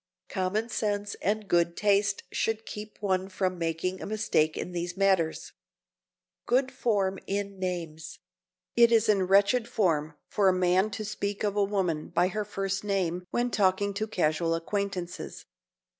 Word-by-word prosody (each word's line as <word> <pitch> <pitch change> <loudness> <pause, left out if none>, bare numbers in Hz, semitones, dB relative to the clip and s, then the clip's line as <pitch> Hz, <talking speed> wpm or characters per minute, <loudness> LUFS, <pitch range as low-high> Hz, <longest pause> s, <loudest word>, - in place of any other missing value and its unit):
Common 205 +3 -1
sense 205 -3 -1
and 210 +1 0
good 170 -1 +2
taste 200 -1 +2
should 225 0 -1
keep 210 0 -8
one 190 -2 0
from 185 -1 -1
making 165 +3 -2
a - - -5
mistake 200 -7 +1
in - - -4
these 175 +1 -4
matters. 190 -5 +1
[Sidenote: - - -52
GOOD 260 +2 +2
FORM 200 -7 0
IN 200 0 -3
NAMES] 170 -3 -4 0.6
It 235 0 +6
is 225 -1 +4
in 195 -3 +3
wretched 205 +5 +4
form 160 -10 0
for 200 -2 +3
a - - +3
man 185 +2 +3
to 215 0 -5
speak 205 -1 -3
of 205 -1 0
a 205 - +3
woman 190 -6 -1
by 175 +2 +2
her 210 +3 -2
first 195 -1 -3
name 180 -3 -1
when 240 0 0
talking 200 0 +2
to 215 +2 -2
casual 165 -3 +1
acquaintances. 180 0 -4
195 Hz, 160 wpm, -28 LUFS, 180-210 Hz, 0.6 s, It